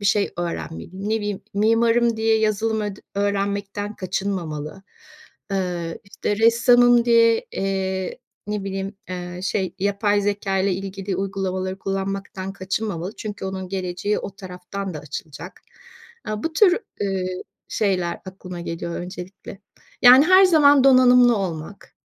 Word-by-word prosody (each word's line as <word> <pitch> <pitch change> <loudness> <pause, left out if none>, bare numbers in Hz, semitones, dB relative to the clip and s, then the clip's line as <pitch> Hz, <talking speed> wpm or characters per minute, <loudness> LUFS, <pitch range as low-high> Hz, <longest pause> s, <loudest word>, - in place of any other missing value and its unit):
bir 200 - -1
şey 200 0 +2
öğrenmeliyim. 175 +3 -5
Ne 220 - +2
bileyim, 205 -2 -3
mimarım 230 +2 +3
diye 220 0 +2
yazılım 220 +1 0
öd 205 -1 -4 0.2
öğrenmekten 200 +1 -2
kaçınmamalı. 185 -4 -4 0.7
Eee, 175 -3 -2
işte, 205 +1 -3
ressamım 240 +1 +5
diye, 230 -1 +4
eee, 190 +1 -2 0.3
ne 210 -1 -3
bileyim, 195 +1 -4 0.2
eee, 180 0 -6
şey, 190 -2 -1
yapay 205 +1 +1
zekâyla 195 -1 0
ilgili 195 0 -4
uygulamaları 190 -1 -3
kullanmaktan 195 0 -4
kaçınmamalı 195 -1 -4
çünkü 210 -2 -6
onun 190 -1 -4
geleceği 185 +2 -2
o - - -6
taraftan 185 0 -7
da 150 - -4
açılacak. 155 +3 -8 0.7
Aaa, 215 0 -3
bu 325 - -2
tür, 360 +2 +5 0.2
eee, 185 -2 -2 0.3
şeyler 185 -5 -1
aklıma 185 -2 -8
geliyor 170 0 -5
öncelikle. 180 +3 -8 0.4
Yani, 255 +4 +9
her 375 +2 +7
zaman 290 -6 +6
donanımlı 250 -3 +6
olmak, 180 0 -6
195 Hz, 125 wpm, -22 LUFS, 185-215 Hz, 0.7 s, Yani